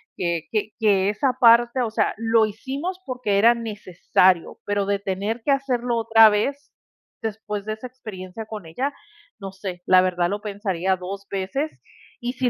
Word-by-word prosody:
que 170 -2 -1
que 215 -1 -1
que 200 -3 +3
esa 250 +6 0
parte 235 +1 +5
o 235 - 0
sea, 215 0 0
lo 225 0 +3
hicimos 275 - -5
porque, 245 -6 0
era 230 +3 +6
necesario, 190 -5 +1
pero 205 -1 0
de 200 0 0
tener 200 +4 -3
que - - -3
hacerlo 250 -3 0
otra 225 -1 +6
vez 275 +8 -2 0.5
después 210 -2 -4
de 215 - -2
esa 220 +3 -9
experiencia 215 -5 -9
con 215 -5 -7
ella, 260 - -3 0.5
no 195 -2 -6
sé, 190 -2 -7
la 185 0 +6
verdad 180 -1 +1
lo 205 +2 -3
pensaría 195 -3 -1
dos 195 +2 -7
veces 265 +11 -2 0.5
y 245 -1 -3
si 255 -1 0
215 Hz, 170 wpm, -23 LUFS, 195-240 Hz, 0.5 s, era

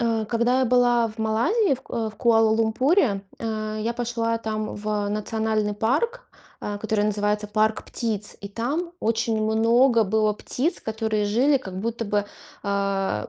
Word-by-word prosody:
А, 230 -2 +1
когда 240 +3 +2
я - - +3
была 245 -1 +3
в 215 +1 -13
Малайзии, 240 - +2
в 260 - -11
К - - -21
э, 225 -2 -2
в 215 - -19
Куала-Лумпуре, 225 - +3 0.2
а, 215 -1 -3
я 230 +2 -1
пошла 230 -1 -1
там 215 -1 -3
в 210 0 -2
национальный 215 0 -1
парк, 300 - -1 0.3
а, 205 - -4
который 215 -1 0
называется 210 0 0
"Парк 215 +1 +1
птиц", 215 -3 -4
и 200 - -5
там 290 - -2
очень 225 0 0
много 230 +2 +4
было 215 +1 +2
птиц, 275 - -2
которые 220 -1 -1
жили 250 +8 +3
как 190 -6 -7
будто 230 +1 -3
бы, 205 -1 0 0.4
а 195 - -1
220 Hz, 160 wpm, -24 LUFS, 210-235 Hz, 0.4 s, много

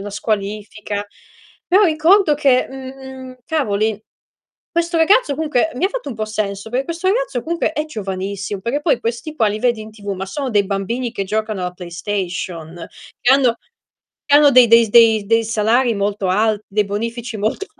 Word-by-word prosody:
la 205 +1 -6
squalifica. 205 0 -3 0.6
Però 385 +4 +4
ricordo 325 +1 +4
che, 275 -3 +2
mhmm, 265 -1 -9
cavoli, 220 -9 -1 0.7
questo 340 0 -1
ragazzo 325 - +4
comunque 310 -1 0
mi 320 - -1
ha - - +3
fatto - - -5
un - - -6
po' 215 - -2
senso, 215 0 -4
per 260 +2 -1
questo 340 +2 -2
ragazzo 420 - 0
comunque 335 -1 -1
è 305 -1 -2
giovanissimo, 200 -4 -5
perché 255 +8 -2
poi 295 -6 +1
questi 235 +7 -4
qua 220 -5 +3
li 210 - -3
vedi 235 -2 +1
in 215 0 -9
TV 210 -1 -15
ma 190 +1 -5
sono 270 +5 -4
dei 205 -3 +2
bambini 225 +6 -2
che 200 - -3
giocano 215 -1 -2
alla 180 - -3
PlayStation, 175 -2 -5 0.3
che 245 +2 +4
hanno 255 -4 +3 0.7
che 285 - +3
hanno 295 -1 +6
dei 250 -2 +7
dei 230 0 +7
s - - -10
dei 220 -3 +5
dei 225 +1 +2
salari 225 +2 +1
molto 200 -1 -1
alt 215 +2 +1
dei 210 +1 +1
bonifici 230 +3 -4
molto 220 - -2
230 Hz, 180 wpm, -19 LUFS, 205-275 Hz, 0.7 s, dei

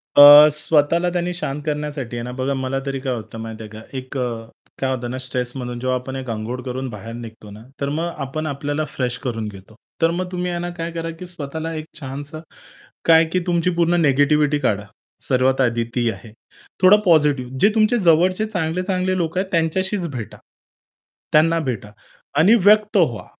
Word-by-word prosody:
अ, 145 +1 +11
स्वतःला 155 +3 +2
त्यांनी 175 0 -1
शांत 150 -5 -4
करण्यासाठी 150 -5 -3
आहे 115 - -4
ना 125 - -5
बघा 135 +2 -1
मला 135 0 -2
तरी 135 -1 -3
काय 130 -1 -2
होतं 115 -1 -7
माहिती 110 0 -7
आहे 105 - -9
का, 110 +1 -10 0.2
एक 130 +1 -6
अ, 115 -3 -3 0.4
काय 135 - +1
होतं 120 -1 -5
ना 130 - -4
स्ट्रेस 125 -1 -3
म्हणून 125 -2 -5
जेव्हा 130 0 0
आपण 130 +1 -7
एक 130 -2 -6
अंघोळ 115 +3 -4
करून 130 +1 -4
बाहेर 110 0 -8
निघतो 110 -3 -10
ना, 105 +2 -11 0.2
तर 140 - 0
मग 165 +4 -2
आपण 155 +4 -4
आपल्याला 145 +1 -2
फ्रेश 125 -1 -1
करून 115 -5 -3
घेतो. 100 +1 -12 0.3
तर 165 - +4
मग 180 +1 -3
तुम्ही 180 0 -2
आहे 175 - -3
ना 175 - -3
काय 165 0 -4
करा 165 0 -4
की 180 - -7
स्वतःला 160 -1 -5
एक 155 -1 -5
छानसं 145 +2 -7 0.6
काय, 165 0 +6
की 165 +3 -1
तुमची 175 0 +1
पूर्ण 170 0 +2
निगेटिव्हिटी 145 +1 +3
काढा. 105 -7 0 0.5
सर्वात 130 +1 +2
आधी 120 -2 +1
ती 120 -2 +1
आहे. 110 -1 -11 0.5
थोडा 185 +3 +8
पॉझिटिव्ह 145 -7 +3
जे 205 - +5
तुमचे 220 +2 +3
जवळचे 180 +3 +3
चांगले-चांगले 185 0 -1
लोक 170 0 -2
आहेत, 190 - 0
त्यांच्याशीच 180 +3 0
भेटा. 115 -5 -6 1.0
त्यांना 165 +2 +4
भेटा 120 -8 -4 0.5
आणि 195 +9 +6
व्यक्त 210 0 +5
व्हा. 125 - +1
145 Hz, 185 wpm, -21 LUFS, 125-170 Hz, 1.0 s, अ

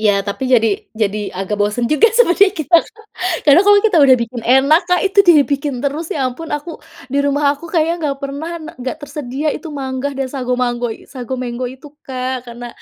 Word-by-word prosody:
Iya 210 -1 +3
tapi 215 +6 -3
jadi 230 -3 +4 0.3
jadi 215 -1 0 0.2
agak 195 +2 -3
bosan 210 +4 0
juga 430 +10 +5
sebenernya 400 -4 +5
kita 325 +3 +4 0.7
karena 295 +3 +6
kalau 410 0 +7
kita 375 -6 +2
udah 260 -2 +6
bikin 235 +1 -6
enak 275 +6 +4
Kak 360 0 +3
itu 390 +1 -1
dibikin 285 -3 +3
terus 305 +4 -2
ya 275 - -1
ampun 320 +6 -8
aku 295 +4 -8 0.4
di 280 - +1
rumah 285 +1 0
aku 290 +3 -11
kayaknya 330 -1 +2
nggak 280 -2 -2
pernah 280 +4 -5
ana 315 -1 -8
nggak 255 +3 -4
tersedia 285 +1 -4
itu 330 - -9
mangga 260 +1 -3
dan 265 -1 -2
sago 255 -3 -3
mango 240 -1 -1
i - - -16
sago 255 -1 -5
mango 250 0 -4
itu 265 +3 -12 0.2
Kak 255 -1 -4
karena, 240 +1 -8
270 Hz, 195 wpm, -17 LUFS, 245-305 Hz, 0.7 s, kalau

